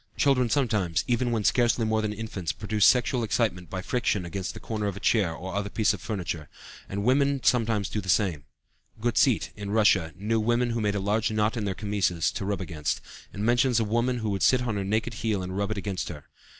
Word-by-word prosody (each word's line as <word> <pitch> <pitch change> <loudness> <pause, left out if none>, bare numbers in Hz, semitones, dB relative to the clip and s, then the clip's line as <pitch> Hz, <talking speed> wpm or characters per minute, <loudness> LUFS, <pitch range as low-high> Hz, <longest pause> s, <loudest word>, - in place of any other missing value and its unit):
Children 130 -4 +3
sometimes, 110 - +1
even 120 0 +1
when 115 -3 0
scarcely 120 +1 +2
more 110 0 +1
than 110 -1 -1
infants, 105 -6 -4
produce 105 -1 +2
sexual 125 0 +3
excitement 100 -5 -1
by 95 -1 -4
friction 105 -6 0
against 90 +2 -4
the - - -7
corner 105 -2 -3
of 100 -1 -3
a - - -6
chair 105 -5 +2
or 90 +3 -7
other 100 0 -2
piece 110 0 +2
of - - -7
furniture, 90 - -4 0.4
and 100 +1 -3
women 140 +3 +3
sometimes 115 -4 +2
do 105 - -3
the 95 - -8
same. 90 -6 +1 0.5
Guttceit, 120 +1 +2
in 100 -1 -6
Russia, 100 -6 +3
knew 110 +4 0
women 120 +2 +1
who 115 0 -1
made 105 -1 0
a - - 0
large 105 +3 +1
knot 110 +1 +1
in 110 -3 -2
their 95 -2 -2
chemises 100 -6 0
to - - -4
rub 100 0 -2
against, 75 -5 -2 0.3
and 100 +1 -4
mentions 120 0 +3
a - - +2
woman 120 +4 0
who 110 -3 -2
would 95 -1 -2
sit 125 -1 +4
on 120 -3 -2
her 100 - -1
naked 110 +4 -1
heel 110 -3 -1
and 90 +1 -5
rub 100 +1 -1
it 110 - -3
against 100 -2 -3
her. 75 - -8
105 Hz, 225 wpm, -27 LUFS, 95-115 Hz, 0.5 s, sit